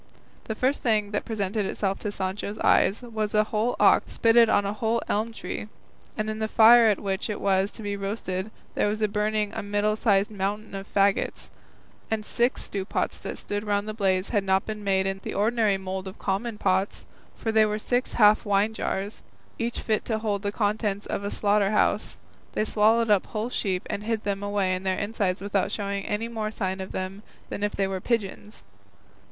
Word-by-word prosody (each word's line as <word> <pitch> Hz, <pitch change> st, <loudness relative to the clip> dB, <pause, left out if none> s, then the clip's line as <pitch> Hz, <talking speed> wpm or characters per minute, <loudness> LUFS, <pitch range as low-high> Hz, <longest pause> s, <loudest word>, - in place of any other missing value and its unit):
The 220 Hz, -, -3 dB
first 260 Hz, +5 st, +1 dB
thing 215 Hz, -3 st, +1 dB
that 205 Hz, -, -2 dB
presented 205 Hz, -2 st, -1 dB
itself 195 Hz, -1 st, -1 dB
to 210 Hz, -, -3 dB
Sancho's 200 Hz, +2 st, -3 dB
eyes 210 Hz, +5 st, +3 dB
was 220 Hz, -3 st, -3 dB
a 215 Hz, -, +5 dB
whole 215 Hz, +3 st, -1 dB
ox -, -, +4 dB
spitted 230 Hz, 0 st, +5 dB
on 200 Hz, -, +3 dB
a 200 Hz, -, -1 dB
whole 225 Hz, +2 st, 0 dB
elm 220 Hz, +3 st, 0 dB
tree, 210 Hz, -1 st, -6 dB, 0.5 s
and 215 Hz, -, -1 dB
in 215 Hz, 0 st, -3 dB
the 220 Hz, -, 0 dB
fire 230 Hz, +1 st, +7 dB
at 210 Hz, -3 st, +2 dB
which 195 Hz, +2 st, -2 dB
it 210 Hz, -, -3 dB
was 195 Hz, 0 st, +2 dB
to 220 Hz, -, -9 dB
be 205 Hz, 0 st, -2 dB
roasted 195 Hz, -1 st, -3 dB, 0.2 s
there -, -, +1 dB
was 215 Hz, +1 st, +1 dB
burning 210 Hz, 0 st, 0 dB
a -, -, -3 dB
middling 205 Hz, +1 st, 0 dB
sized 205 Hz, -2 st, +2 dB
mountain 205 Hz, +2 st, -3 dB
of 195 Hz, +1 st, -7 dB
faggots, 200 Hz, 0 st, +1 dB, 0.6 s
and 220 Hz, -1 st, -1 dB
six 240 Hz, +3 st, 0 dB
stewpots 195 Hz, -1 st, -2 dB
that -, -, -5 dB
stood 205 Hz, 0 st, -4 dB
round 205 Hz, 0 st, 0 dB
the 215 Hz, -, -3 dB
blaze 190 Hz, -3 st, +1 dB
had 205 Hz, -4 st, +1 dB
not 190 Hz, 0 st, +2 dB
been 215 Hz, -1 st, -5 dB
made 190 Hz, -1 st, +2 dB
in 195 Hz, 0 st, -2 dB
the -, -, -5 dB
ordinary 215 Hz, -1 st, +2 dB
mould 190 Hz, 0 st, -5 dB
of 190 Hz, -, -8 dB
common 210 Hz, +3 st, -2 dB
pots, 190 Hz, 0 st, 0 dB, 0.3 s
for 225 Hz, -, -2 dB
they 220 Hz, 0 st, +5 dB
were 210 Hz, 0 st, -1 dB
six 245 Hz, +4 st, -1 dB
half 210 Hz, -2 st, +5 dB
wine 205 Hz, 0 st, +2 dB
jars, 200 Hz, -1 st, -3 dB, 0.4 s
each 235 Hz, +1 st, -2 dB
fit 215 Hz, -2 st, 0 dB
to 220 Hz, -, 0 dB
hold 210 Hz, -2 st, -1 dB
the 200 Hz, 0 st, -2 dB
contents 205 Hz, -1 st, -1 dB
of 200 Hz, -, -3 dB
a 200 Hz, -, -2 dB
slaughter 205 Hz, -1 st, +2 dB
house; 215 Hz, -, +1 dB, 0.4 s
they 215 Hz, -, 0 dB
swallowed 220 Hz, +1 st, +3 dB
up 200 Hz, -3 st, +3 dB
whole 220 Hz, +3 st, -3 dB
sheep 190 Hz, -6 st, -1 dB
and 200 Hz, -, -3 dB
hid 225 Hz, -1 st, -1 dB
them 200 Hz, -1 st, -2 dB
away 205 Hz, -2 st, 0 dB
in 185 Hz, -, -2 dB
their 190 Hz, -1 st, 0 dB
insides 200 Hz, -3 st, -1 dB
without 200 Hz, -1 st, 0 dB
showing 200 Hz, -1 st, -2 dB
any 215 Hz, +2 st, -1 dB
more 220 Hz, -2 st, -3 dB
sign 190 Hz, -3 st, -3 dB
of 190 Hz, -, -6 dB
them 190 Hz, +2 st, -4 dB, 0.3 s
than -, -, -5 dB
if 205 Hz, 0 st, 0 dB
they 195 Hz, -, 0 dB
were 190 Hz, -1 st, -3 dB
pigeons. 210 Hz, -1 st, -3 dB
205 Hz, 205 wpm, -26 LUFS, 195-220 Hz, 0.6 s, fire